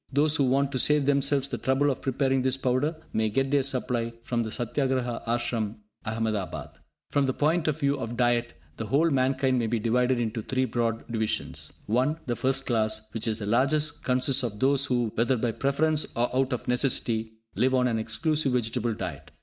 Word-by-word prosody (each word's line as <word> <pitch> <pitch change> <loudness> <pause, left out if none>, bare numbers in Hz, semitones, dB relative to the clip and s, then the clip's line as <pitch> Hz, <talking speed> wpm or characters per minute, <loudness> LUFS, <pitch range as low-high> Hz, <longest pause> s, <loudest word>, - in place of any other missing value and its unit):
Those 145 +3 +4
who 140 - +2
want 135 +2 +2
to 130 - -1
save 150 0 +3
themselves 140 0 +2
the 120 - -4
trouble 135 +4 +2
of 130 - -5
preparing 135 0 +1
this 130 0 +1
powder 135 +5 0 0.2
may 110 0 +1
get 135 +5 0
their 145 -1 +4
supply 125 -3 -1
from 120 -1 -1
the 110 - -3
Satyagraha 125 0 -1
Ashram, 115 -2 -1 0.3
Ahmedabad. 110 -3 -3 0.4
From 140 -1 +2
the 130 - -1
point 160 +2 +1
of 155 0 0
view 140 -1 +1
of 115 -1 -5
diet, 120 -1 +1 0.2
the 110 - -4
whole 155 +8 +3
mankind 130 -1 +2
may 115 - 0
be 115 - 0
divided 125 +3 +1
into 115 -1 -2
three 130 +4 0
broad 115 -1 -1
divisions. 110 -2 -2
(1) 130 +8 +1
The 120 - -1
first 135 +2 +1
class, 110 -2 0
which 115 +1 -3
is 110 -1 0
the 105 - -5
largest, 140 +7 +1
consists 130 +1 +3
of 110 -5 -4
those 140 +2 +4
who, 120 -3 0
whether 120 +3 +1
by 115 0 0
preference 150 +5 0
or 120 +1 0
out 130 0 +1
of 125 - -3
necessity, 120 -3 0 0.2
live 130 +1 +2
on 125 -1 +3
an 115 -2 0
exclusive 135 +6 0
vegetable 120 -1 0
diet. 80 -8 -6
125 Hz, 195 wpm, -27 LUFS, 115-135 Hz, 0.4 s, Those